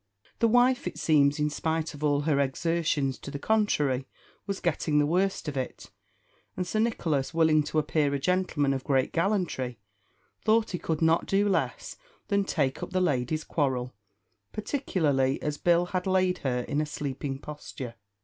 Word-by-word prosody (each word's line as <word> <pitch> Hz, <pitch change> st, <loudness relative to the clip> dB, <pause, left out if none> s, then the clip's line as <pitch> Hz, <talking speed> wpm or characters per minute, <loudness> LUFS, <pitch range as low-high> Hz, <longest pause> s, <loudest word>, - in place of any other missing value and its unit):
The 230 Hz, -, +4 dB
wife, 245 Hz, +2 st, +3 dB
it -, -, -5 dB
seems, 145 Hz, -2 st, +3 dB
in 150 Hz, 0 st, 0 dB
spite 160 Hz, +1 st, -2 dB
of 150 Hz, 0 st, -9 dB
all 145 Hz, -1 st, +2 dB
her 145 Hz, -2 st, +1 dB
exertions 145 Hz, -1 st, 0 dB
to -, -, -8 dB
the 140 Hz, -, -5 dB
contrary, 145 Hz, -10 st, +1 dB, 0.4 s
was 195 Hz, -1 st, -2 dB
getting 155 Hz, -2 st, 0 dB
the 145 Hz, -, +4 dB
worst 185 Hz, +2 st, 0 dB
of 150 Hz, -, -3 dB
it; 130 Hz, -1 st, -5 dB, 0.7 s
and 180 Hz, -, -1 dB
Sir 215 Hz, +5 st, -1 dB
Nicholas, 165 Hz, -, 0 dB
willing 160 Hz, -2 st, +4 dB
to 155 Hz, -, -3 dB
appear 150 Hz, -1 st, +1 dB
a 140 Hz, -, 0 dB
gentleman 160 Hz, -3 st, +1 dB
of 135 Hz, -1 st, -3 dB
great 135 Hz, -3 st, +1 dB
gallantry, 165 Hz, -, 0 dB, 0.7 s
thought 220 Hz, 0 st, +3 dB
he 180 Hz, -, -3 dB
could 160 Hz, 0 st, -1 dB
not 160 Hz, +1 st, +3 dB
do 200 Hz, +1 st, +2 dB
less 195 Hz, -, -1 dB, 0.3 s
than 200 Hz, -1 st, +2 dB
take 140 Hz, -8 st, -1 dB
up -, -, -4 dB
the 185 Hz, -, 0 dB
lady's 155 Hz, -2 st, 0 dB
quarrel, 130 Hz, -5 st, -1 dB, 0.6 s
particularly 155 Hz, -, 0 dB
as 150 Hz, -1 st, -2 dB
Bill 175 Hz, 0 st, +3 dB
had 180 Hz, +1 st, -3 dB
laid 185 Hz, -1 st, +2 dB
her 125 Hz, -2 st, -1 dB
in 145 Hz, +4 st, -1 dB
a 155 Hz, -, -2 dB
sleeping 140 Hz, -2 st, -4 dB
posture. 140 Hz, -4 st, -8 dB
155 Hz, 170 wpm, -28 LUFS, 140-185 Hz, 0.7 s, The